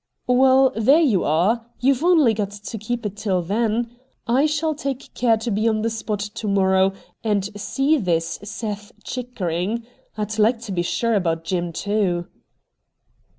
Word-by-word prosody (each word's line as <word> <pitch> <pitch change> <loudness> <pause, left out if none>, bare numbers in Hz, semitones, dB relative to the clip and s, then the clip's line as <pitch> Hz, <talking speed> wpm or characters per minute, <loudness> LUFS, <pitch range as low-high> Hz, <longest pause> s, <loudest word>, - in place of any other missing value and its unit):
' - - -53
Well, 260 +1 +5
there 225 +7 +5
you 250 - +3
are. 200 +10 +1
You've 270 +2 +2
only 320 -10 +5
got 205 -2 -2
to 205 +2 -7
keep 230 +2 -4
it 205 0 -4
tiD 190 -5 -1
then. 230 +3 0 0.3
I 260 +6 +3
shall 310 +1 0
take 275 -3 -5
care 230 -2 +2
to 225 +2 -3
be 215 +3 +1
on 215 -1 +1
the 230 - 0
spot 220 -2 -3
to 210 +1 -5
morrow 190 -1 +3 0.3
and 205 -3 +1
see 275 +8 +1
this 165 -5 -1
Seth 210 0 -5
Chicker 245 -8 -4
ing. 200 +8 -2 0.3
I'd 215 0 -3
like 225 +3 +4
to 230 -3 -7
be 180 -2 0
sure 230 +6 0
about 165 -5 0
Jim, 175 0 -2
too.' 185 -1 -1
215 Hz, 170 wpm, -22 LUFS, 195-240 Hz, 0.3 s, Well